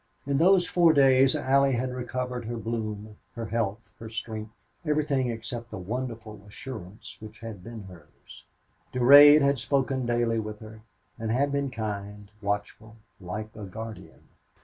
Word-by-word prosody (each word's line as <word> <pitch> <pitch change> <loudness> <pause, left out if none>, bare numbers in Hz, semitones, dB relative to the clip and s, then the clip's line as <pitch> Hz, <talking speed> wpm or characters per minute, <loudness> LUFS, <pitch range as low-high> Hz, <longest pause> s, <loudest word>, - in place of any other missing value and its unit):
In 140 0 0
those 180 +1 +5
four 170 -2 +4
days 135 -2 +5
Allie 135 0 +3
had 125 +1 -1
recovered 125 -1 -4
her 120 +1 -4
bloom, 110 -2 -5 0.2
her 115 -1 -4
health, 110 -1 -3
her 110 - -8
strength 110 -1 -7 0.2
everything 150 -5 0
except 115 +1 -6
the - - -7
wonderful 110 +1 -6
assurance 105 -3 -9
which 110 0 -11
had 110 -5 -8
been 115 -2 -8
hers. 85 -6 -15 0.5
Durade 145 +4 +8
had 140 -1 +2
spoken 135 -1 0
daily 120 -1 +1
with 105 -1 -5
her, 110 0 -12 0.4
and 110 0 -3
had 140 +5 +1
been 140 -1 -1
kind, 105 -3 -6
watchful, 105 +2 -4 0.2
like 105 +4 -6
a 105 - -7
guardian. 110 +3 -9
115 Hz, 150 wpm, -27 LUFS, 110-130 Hz, 0.5 s, Durade